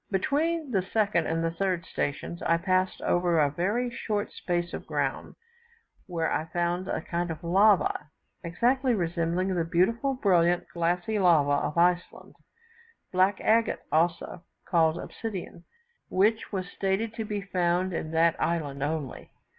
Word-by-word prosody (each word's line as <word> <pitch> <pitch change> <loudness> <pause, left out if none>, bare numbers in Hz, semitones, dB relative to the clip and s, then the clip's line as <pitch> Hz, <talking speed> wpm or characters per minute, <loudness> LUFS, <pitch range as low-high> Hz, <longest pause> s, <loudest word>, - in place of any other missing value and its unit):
Between 295 - 0
the 195 -5 +2
second 200 -3 0
and 165 0 -1
third 185 -3 -1
stations, 145 +4 -4
I 165 - +2
passed 185 +1 0
over 175 -1 +2
a 145 -2 +3
very 210 - -1
short 210 -3 -3
space 175 -1 -2
of - - -6
ground, - - -2 0.7
where 165 -3 -1
I 155 - -1
found 175 +2 -2
a - - -2
kind 175 0 -2
of 165 +1 -6
lava, 190 -3 +3 0.4
exactly 245 +9 +1
resembling 175 +1 -1
the 175 -2 0
beautiful, 210 +11 +1
brilliant, 175 -6 +2
glassy 175 +5 0
lava 150 -6 +3
of 150 - -7
Iceland 175 +1 +1 0.8
(black 190 +2 +2
agate, 230 +1 +2
also 165 +1 0 0.2
called 165 -2 +2
obsidian), 190 -5 -7 0.4
which 215 +4 +1
was 185 -3 -3
stated 200 +4 -2
to 225 -1 -4
be 210 -1 -3
found 185 -1 0
in 160 - -3
that 165 +1 +3
island 145 -5 -1
only. 145 -2 -3
180 Hz, 140 wpm, -27 LUFS, 170-205 Hz, 0.8 s, a